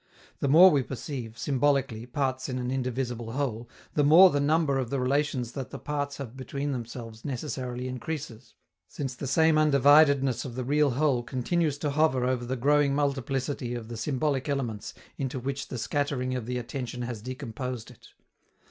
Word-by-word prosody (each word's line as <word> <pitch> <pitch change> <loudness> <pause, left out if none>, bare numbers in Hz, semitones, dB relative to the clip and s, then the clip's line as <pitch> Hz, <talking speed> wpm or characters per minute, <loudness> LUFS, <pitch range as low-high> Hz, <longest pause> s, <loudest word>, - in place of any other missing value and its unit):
The - - 0
more 175 +7 +8
we 145 -3 +3
perceive, 125 -3 -6
symbolically, 135 -2 0
parts 130 +1 -2
in 130 - -2
an 125 0 -2
indivisible 125 -3 -3
whole, 120 -4 -3 0.2
the 145 - +2
more 170 +6 +8
the 145 - +1
number 145 -1 +2
of 125 -3 -2
the 140 - -1
relations 130 -2 0
that 130 0 -6
the - - -7
parts 145 -1 -3
have 130 -3 -7
between 140 +2 -4
themselves 115 -3 -6
necessarily 130 -2 -4
increases, 130 -2 -6 0.3
since 135 -3 -5
the 135 +2 -6
same 160 +3 +4
undividedness 140 -2 +5
of 125 -4 -7
the 130 - -3
real 145 +2 +3
whole 140 -5 +2
continues 140 +5 -1
to 145 0 -2
hover 140 -4 +2
over 125 -1 0
the 130 +2 -2
growing 140 +2 +3
multiplicity 135 -3 -1
of 115 -2 -7
the 120 - -5
symbolic 135 +2 -1
elements 115 -6 -3 0.2
into 135 -2 -2
which 135 +2 -4
the 125 - -5
scattering 130 0 -1
of 125 -3 -4
the 125 0 -2
attention 125 0 -5
has 120 -3 -5
decomposed 125 -1 -6
it. 125 - -17
130 Hz, 175 wpm, -28 LUFS, 125-145 Hz, 0.3 s, more